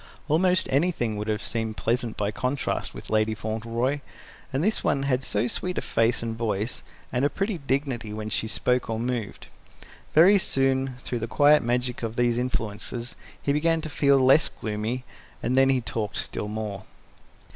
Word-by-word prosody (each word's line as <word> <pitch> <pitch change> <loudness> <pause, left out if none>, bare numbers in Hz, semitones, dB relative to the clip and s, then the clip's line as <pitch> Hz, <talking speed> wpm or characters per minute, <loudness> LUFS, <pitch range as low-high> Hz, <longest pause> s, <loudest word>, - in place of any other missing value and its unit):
Almost 180 +4 +3
anything 135 -6 +1
would 105 +1 -4
have 110 0 -1
seemed 110 -2 -3
pleasant 115 +4 -1
by 105 0 0
contrast 130 +6 -2
with - - -8
Lady 110 0 +2
Fauntleroy; 115 +6 -2 0.5
and 135 +3 0
this 215 +3 +1
one 135 - +1
had 135 -1 +1
so 105 -3 +1
sweet 180 +8 -3
a - - +1
face 115 +1 +1
and 115 -1 -3
voice, 110 -1 -2 0.3
and 125 +1 +1
a 145 - +4
pretty 195 0 -2
dignity 135 -5 -2
when 105 0 -5
she 110 - -1
spoke 125 +2 0
or 110 0 -1
moved. 120 -3 -3 0.7
Very 190 +6 +7
soon, 135 -4 +1
through 120 - -2
the 115 - -3
quiet 145 +4 +5
magic 125 +1 -1
of 115 -1 -3
these 120 0 +2
influences, 115 0 -3 0.2
he 140 - 0
began 165 +2 +2
to 155 - -5
feel 140 -2 +4
less 135 +4 +5
gloomy, 110 +4 -3 0.4
and 125 - +1
then 135 0 +5
he 130 -2 +3
talked 110 -3 -3
still 105 - -1
more. 105 -2 -5
125 Hz, 175 wpm, -26 LUFS, 110-140 Hz, 0.7 s, Very